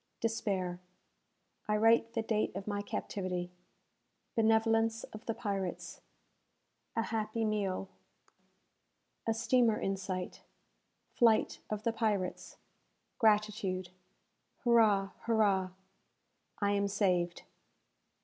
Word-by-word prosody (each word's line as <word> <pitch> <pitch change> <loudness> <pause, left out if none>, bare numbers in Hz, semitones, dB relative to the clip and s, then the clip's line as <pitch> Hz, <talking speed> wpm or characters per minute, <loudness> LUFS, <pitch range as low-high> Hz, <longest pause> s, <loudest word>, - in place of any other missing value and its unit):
Despair 195 -6 -1 0.9
I 210 0 +2
write 225 +1 +4
the 225 - 0
Date 215 -4 0
of 195 0 -5
my 205 -1 -2
Captivity 180 -3 -3 0.8
Benevolence 225 0 +3
of 215 +2 -10
the 225 - -1
Pirates 195 -4 -4 0.9
A 230 - +1
Happy 225 0 -2
Meal 200 -3 -1 1.4
A 225 - +2
Steamer 230 -1 +3
in 195 - -1
Sight 185 -1 -5 0.7
Flight 230 -2 +3
of 215 0 -3
the 230 - +1
Pirates 210 -5 -2 0.6
Gratitude 210 -4 +2 0.7
Hurrah! 215 -5 +4
Hurrah! 205 -5 +2 0.9
I 200 -1 +1
am 200 0 +1
Saved! 180 -4 0
210 Hz, 95 wpm, -33 LUFS, 195-225 Hz, 1.4 s, write